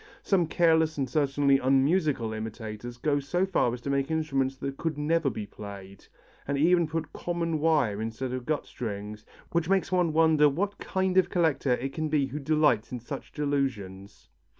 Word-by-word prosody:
Some 180 -5 +2
careless 160 -1 +3
and 135 -2 0
certainly 140 0 +2
unmusical 135 -2 +2
imitators 110 +2 -6
go 145 +2 +1
so 175 +7 0
far 175 -10 +1
as 120 0 -6
to 140 - -3
make 140 0 0
instruments 135 -4 0
that 135 0 -4
could 160 -3 -2
never 155 0 +1
be 105 -3 -5
played, 100 -1 -10 0.4
and 140 0 0
even 170 +3 +4
put 160 -1 -4
common 170 -2 -2
wire 145 -10 +2
instead 115 +3 -4
of 130 -1 -5
gut 155 -1 -1
strings, 105 -2 -6 0.2
which 170 0 0
makes 195 -1 +1
one 180 -3 +2
wonder 155 -2 +5
what 200 +8 -2
kind 190 0 -1
of 185 - +1
collector 150 -7 +1
it 135 +3 -3
can 155 -1 -2
be 150 -2 +2
who 135 +3 -5
delights 150 -6 +2
in 125 - -4
such 135 +4 -8
delusions. 125 -10 -3
140 Hz, 175 wpm, -28 LUFS, 120-160 Hz, 0.4 s, wonder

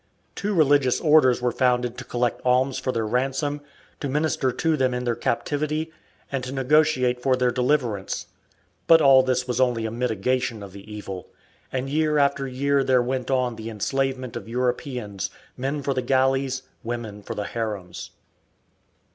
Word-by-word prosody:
Two 205 0 -2
religious 145 -5 +4
orders 150 -6 +4
were 125 - +2
founded 125 -1 +1
to - - -7
collect 120 0 -1
alms 130 +1 +2
for 130 - -1
their 115 -3 -1
ransom, 135 +5 -1 0.4
to 140 - -3
minister 150 -2 +1
to 160 +6 +1
them 130 -3 +1
in 125 - -2
their 120 -1 +1
captivity, 150 +6 -1 0.4
and 135 -2 -2
to 130 - -5
negotiate 135 -2 +2
for 130 0 +3
their 125 -1 +2
deliverance. 125 -6 0 0.6
But 165 -1 +8
all 135 -3 +7
this 130 -1 0
was 125 0 0
only 120 -3 +1
a 110 - -2
mitigation 120 -1 -1
of 100 - -9
the 100 +2 -11
evil, 100 -3 -7 0.4
and 130 0 -2
year 150 +1 +1
after 140 -1 +2
year 140 +2 +1
there 130 -2 +3
went 130 0 -2
on 125 -3 0
the 110 +1 -6
enslavement 130 +3 -2
of - - -6
Europeans, 125 - -2 0.3
men 140 +3 -3
for 140 - 0
the 130 - -1
galleys, 130 +1 +1 0.2
women 115 -3 -5
for - - -6
the 105 - -3
harems. 105 -6 -5
130 Hz, 165 wpm, -24 LUFS, 120-140 Hz, 0.6 s, But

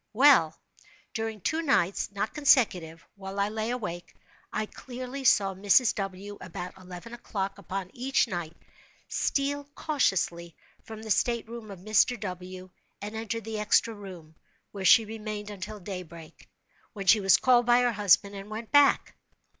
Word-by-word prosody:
Well, 215 - +5 0.5
during 220 -2 -4
two 315 - 0
nights 200 - +1
(not 200 +2 -3
consecutive) 185 - +2
while 195 0 -7
I 200 +1 +1
lay 220 +1 -3
awake, 210 -8 -5 0.4
I 215 - -2
clearly 255 +4 -8
saw 195 -6 +4
Mrs. 205 +5 +4
W., 195 +1 -6
about 180 +1 -7
eleven 185 +4 -10
o'clock 200 -4 -4
upon 190 -1 -5
each 260 +1 +1
night, 175 -6 -5 0.5
steal 285 +1 -1
cautiously 175 - -1 0.3
from 220 0 -10
the 220 - -4
state 235 +1 +1
room 230 -2 -9
of 190 -3 -10
Mr. 215 +4 +2
W., 185 -1 -7 0.3
and 210 +2 -7
enter 225 +1 -3
the 220 -1 -5
extra 215 +2 +2
room, 185 -7 -11 0.4
where 195 -2 -6
she 225 +3 +7
remained 215 -1 -6
until 205 +2 -7
daybreak, 175 -4 -9 0.4
when 200 -3 -6
she 215 +3 +6
was 195 -2 +5
called 245 -2 +3
by 240 0 +5
her 245 -1 +2
husband 205 -1 +3
and 200 +1 -8
went 220 +1 -7
back. 290 -1 +4
210 Hz, 155 wpm, -28 LUFS, 185-235 Hz, 0.5 s, she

